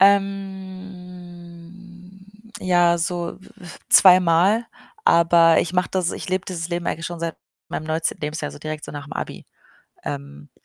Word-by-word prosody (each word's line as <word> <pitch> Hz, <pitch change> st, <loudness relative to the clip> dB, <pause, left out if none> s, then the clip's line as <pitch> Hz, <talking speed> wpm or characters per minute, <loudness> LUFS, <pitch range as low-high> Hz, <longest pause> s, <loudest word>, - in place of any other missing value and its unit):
Ähm, 185 Hz, -2 st, -3 dB, 0.3 s
ja, 175 Hz, -2 st, +3 dB
so, 170 Hz, 0 st, -2 dB
äh, -, -, -28 dB, 0.5 s
zweimal, 185 Hz, +4 st, +6 dB, 0.4 s
aber 170 Hz, 0 st, +5 dB
ich 170 Hz, -, -3 dB
mache 180 Hz, -1 st, +1 dB
das 185 Hz, -2 st, 0 dB
ich -, -, -7 dB
lebe 185 Hz, +1 st, -1 dB
dieses 170 Hz, -3 st, -5 dB
Leben 175 Hz, 0 st, -3 dB
eigentlich 165 Hz, -, -2 dB
schon 170 Hz, -1 st, -7 dB
seit 165 Hz, -1 st, -3 dB, 0.3 s
meinem 155 Hz, -, -4 dB
19. 160 Hz, +1 st, -2 dB
Lebensjahr, 150 Hz, 0 st, -3 dB
also, -, -, -10 dB
direkt 155 Hz, 0 st, -6 dB
so -, -, -9 dB
nach'm 145 Hz, 0 st, -8 dB
Abi. -, -, -6 dB, 0.6 s
Ähm, 70 Hz, +1 st, -7 dB
175 Hz, 140 wpm, -22 LUFS, 165-185 Hz, 0.6 s, zweimal